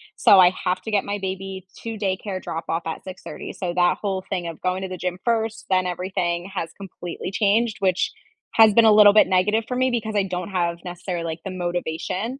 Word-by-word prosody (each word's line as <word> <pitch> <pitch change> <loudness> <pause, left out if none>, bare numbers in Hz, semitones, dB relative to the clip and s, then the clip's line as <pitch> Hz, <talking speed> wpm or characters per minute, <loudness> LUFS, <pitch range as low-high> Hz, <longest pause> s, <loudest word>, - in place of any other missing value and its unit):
so, 195 - +6
I 180 -1 +7
have 185 0 0
to 220 - -6
get 205 - +1
my 205 0 -3
baby 190 0 -5 0.2
to 225 -1 -4
daycare 190 -1 -2
drop 165 0 -5
off 165 0 -2
at 160 - -5
06:30 185 -1 -8
so, 175 -3 -3
that 175 0 +3
whole 195 -2 -2
thing 180 -3 -2
of 165 - -7
going 185 +1 -1
to 190 - -4
the 185 - -5
gym 180 +1 -3
first, 225 -1 -1
then 185 -1 +2
everything, 180 0 -2
has 165 -3 -3
completely 185 -2 -7
changed, 220 +3 +2
which 185 -2 +1 0.4
has 220 -2 +7
been 230 +1 +6
a 220 - +7
little 210 -1 +8
bit 215 - +6
negative 210 +4 +2
for 250 - -3
me 255 +1 +2
because 220 -3 -2
I 200 - +3
don't 180 0 -4
have 170 -3 -1
necessarily, 175 -1 -4
like, 160 0 -4
the 195 - -4
motivation, 180 +6 -3
190 Hz, 220 wpm, -23 LUFS, 180-210 Hz, 0.4 s, little